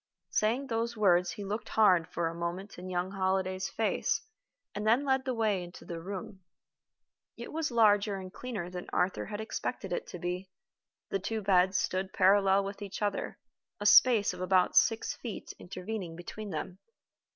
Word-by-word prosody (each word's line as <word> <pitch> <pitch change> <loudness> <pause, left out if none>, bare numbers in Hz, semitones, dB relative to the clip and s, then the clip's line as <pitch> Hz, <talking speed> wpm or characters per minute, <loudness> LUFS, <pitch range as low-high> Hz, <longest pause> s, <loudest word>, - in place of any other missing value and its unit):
Saying 235 +6 +1
those 230 -2 -2
words, 180 -4 +4
he 205 - -7
looked 210 +3 -4
hard, 185 -7 +4
for 170 - -1
a 165 - -3
moment, 175 +3 -5
in 185 +1 -7
young 180 +1 -1
Holliday's 190 -1 -1
face, 220 +3 0 0.5
and 210 +1 -3
then 240 +6 +4
led 265 -1 +1
the 260 - 0
way 215 -4 +1
into 175 0 -10
the 170 -1 -6
room. 190 +1 -6 1.0
It - - -8
was 320 0 -1
larger 210 -3 +4
and 185 -1 -7
cleaner 225 -9 -5
than 180 0 -7
Arthur 180 +1 0
had 205 0 -5
expected 220 - -4
it 485 - -3
would 180 - -8
be. 180 +2 -3 0.6
The 195 - 0
two 215 +3 -3
beds 185 -1 +4
stood 190 +1 -1
parallel 195 0 +4
with 200 +1 -6
each 200 +1 -5
other, 205 - -2 0.4
a 205 - -5
space 220 -1 +6
of - - -8
about 185 0 +3
six 220 +5 +3
feet 230 -5 -7
intervening 185 -1 -6
between 205 +5 -7
them. 180 +2 -5
195 Hz, 175 wpm, -30 LUFS, 180-215 Hz, 1.0 s, space